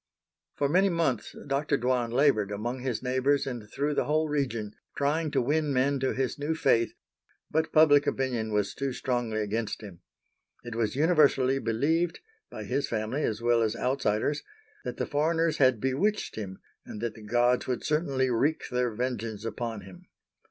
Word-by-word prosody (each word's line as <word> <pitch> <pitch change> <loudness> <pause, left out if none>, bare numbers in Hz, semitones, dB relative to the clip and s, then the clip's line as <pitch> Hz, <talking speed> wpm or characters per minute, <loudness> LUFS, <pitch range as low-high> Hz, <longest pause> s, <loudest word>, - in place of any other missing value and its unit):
For 140 - +1
many 185 +7 +3
months 160 - -1
Dr. 140 +1 0
Dwan 125 -1 0
labored 120 -5 +3
among 115 +5 -3
his 125 -2 -3
neighbors 130 +2 +1
and 120 -5 -6
through 145 +5 -1
the - - 0
whole 155 +1 +1
region 125 -8 -2 0.2
trying 155 +3 +1
to - - +1
win 150 +3 +1
men 135 +1 +2
to 130 0 0
his 130 +1 -2
new 150 +3 -1
faith, 115 -7 +2 0.6
but 160 +1 0
public 145 -2 +6
opinion 120 -5 -1
was 105 -1 0
too 135 -1 -3
strongly 120 -4 -1
against 110 +1 -3
him. 95 -5 -10 0.6
It 120 -1 -6
was 115 -1 -1
universally 140 -4 +3
believed,—by 165 - -2
his 140 - -1
family 110 +5 -2
as 110 +1 -2
well 120 -1 +3
as 110 0 +1
outsiders—that 140 - -2
the - - -1
foreigners 160 +2 +1
had 130 -4 +4
bewitched 150 - 0
him 95 -3 -6 0.3
and 105 - -8
that 115 -2 -2
the 110 - -13
gods 120 +3 +2
would 125 -1 -2
certainly 140 -5 +1
wreak 145 +7 0
their 125 0 +1
vengeance 115 -3 -3
upon 115 -1 -4
him. 95 0 -14
130 Hz, 165 wpm, -28 LUFS, 115-145 Hz, 0.6 s, public